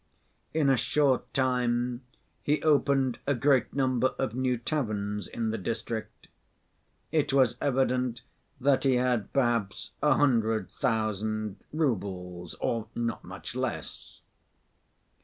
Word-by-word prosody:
In 155 -2 +2
a 135 -1 +4
short 140 +1 +1
time 125 -2 +1 0.4
he 150 +1 +1
opened 140 -4 +3
a 140 - +3
great 135 +1 +3
number 130 -2 +1
of 130 -5 -1
new 130 0 0
taverns 105 - -2
in 115 -2 -2
the 115 - -3
district. 115 +2 -4 0.8
It 155 -3 +1
was 130 -4 +4
evident 125 -3 +1 0.4
that 135 0 +3
he 135 -2 +4
had 125 -4 +1
perhaps 120 -6 0
a 150 -2 +4
hundred 115 -6 +2
thousand 110 -4 -1
roubles 95 - -2
or 115 -2 -2
not 115 -1 -2
much - - -8
less. - - -5
125 Hz, 120 wpm, -28 LUFS, 110-135 Hz, 0.8 s, a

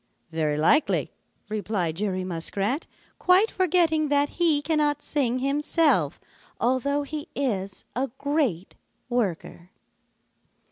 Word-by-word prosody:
"Very 155 -2 0
likely," 280 - +2 0.4
replied 205 -6 -2
Jerry 190 -2 -1
Muskrat, 195 - -2 0.3
quite 370 +5 +4
forgetting 330 -4 +2
that 285 0 +2
he 320 -4 +2
cannot 295 -2 +1
sing 255 -5 0
himself 275 - +1 0.4
although 270 +4 +1
he 295 +1 -6
is 200 -8 -2
a 265 +3 -1
great 280 - -1 0.4
worker. 190 -7 -2
270 Hz, 100 wpm, -25 LUFS, 190-300 Hz, 0.4 s, quite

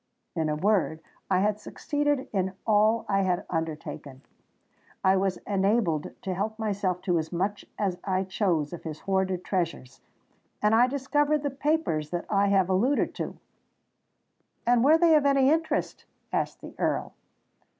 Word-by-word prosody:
In 160 -2 0
a 150 - 0
word, 185 -2 +1 0.3
I 185 -1 +3
had 210 +1 +1
succeeded 290 +2 -1
in 190 -1 0
all 215 +1 +3
I 195 -1 +2
had 180 -2 0
undertaken: 155 -4 -5 0.8
I 190 0 +5
was 190 -1 0
enabled 195 -5 +1
to 190 - -2
help 210 +4 -3
myself 200 -4 -1
to 175 -3 +1
as 160 0 -5
much 195 +4 -2
as 190 -4 -1
I 190 -1 0
chose 180 -6 0
of 175 - -7
his 155 -2 -7
hoarded 190 -2 0
treasures—and 175 - -4
I 240 +3 +6
discovered 290 +2 +1
the 285 - -1
papers 275 - 0
that 175 +1 -3
I 200 -1 +3
have 195 -2 +3
alluded 220 +10 +1
to." - - -5 1.3
"And 240 0 +4
were 305 +4 +6
they 330 -1 +5
of 290 -2 +4
any 275 0 +4
interest?" 320 0 -1 0.3
asked - - -1
the - - -10
Earl. - - -1
195 Hz, 150 wpm, -27 LUFS, 180-240 Hz, 1.3 s, I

